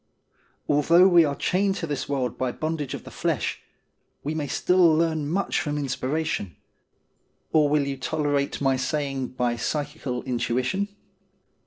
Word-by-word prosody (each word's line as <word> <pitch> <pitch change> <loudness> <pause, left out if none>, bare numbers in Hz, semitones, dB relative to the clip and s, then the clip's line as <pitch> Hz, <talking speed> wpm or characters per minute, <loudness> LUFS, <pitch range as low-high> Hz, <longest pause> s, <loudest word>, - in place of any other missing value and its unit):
Although 165 +5 +5
we 170 -2 +6
are 140 -1 -1
chained 195 +5 +1
to 180 - -3
this 145 -3 -4
world 130 -3 -1
by 130 -1 -1
the - - -16
bondage 155 -3 -2
of - - -9
the - - -11
flesh, - - -2 0.6
we 150 - -2
may 155 -2 -2
still 180 +6 +1 0.2
learn 160 -2 0
much 195 +5 0
from 150 0 -2
inspiration; 140 - -2 1.0
or 150 -2 +4
will 145 -1 +2
you 140 -1 -3
tolerate 145 0 -1
my 135 -2 +2
saying 135 0 -2
by 125 -2 -1
psychical 145 0 -3
intuition 130 +9 -1
145 Hz, 150 wpm, -25 LUFS, 130-160 Hz, 1.0 s, we